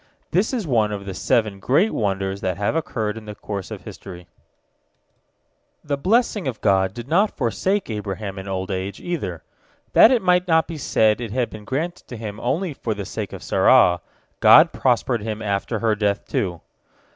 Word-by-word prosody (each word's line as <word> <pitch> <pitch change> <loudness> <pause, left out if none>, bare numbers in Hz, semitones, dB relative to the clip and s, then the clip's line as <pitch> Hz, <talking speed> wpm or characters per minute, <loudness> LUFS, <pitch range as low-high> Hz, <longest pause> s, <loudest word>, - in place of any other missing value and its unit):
This 190 +6 +2
is 240 -7 -2
one 115 -7 +1
of 100 -1 -5
the 95 - -5
seven 105 0 0
great 145 - +2
wonders 95 -2 -2
that 95 0 -2
have 100 +8 -1
occurred 115 -9 -2
in 110 - -15
the 105 -1 -8
course 100 -3 -6
of - - -8
history. 90 -2 -10 1.6
The 145 -1 -1
blessing 210 - +1
of 125 -4 -3
God 95 -1 +2
did 120 0 -7
not 195 +8 +2
forsake 190 - 0
Abraham 105 -2 -5
in 95 - -8
old 95 0 -3
age, 95 +1 -4
either. 100 - -4 0.5
That - - +8
it 245 -5 +2
might 180 0 +3
not 160 -2 +3
be 165 -3 -6
said 110 -4 +2
it 115 - -4
had 125 +1 -1
been 105 -1 -10
granted 160 +9 -3
to 120 - -8
him 105 -1 -6
only 165 +7 -1
for 115 -5 -3
the 100 -1 -5
sake - - -5
of - - -9
Sarah, 90 0 +4 0.4
God - - +7
prospered 115 - +1
him 110 0 -4
after 105 +1 -2
her 110 0 +1
death, 105 -1 -1
too. 95 - -2
110 Hz, 185 wpm, -22 LUFS, 100-150 Hz, 1.6 s, That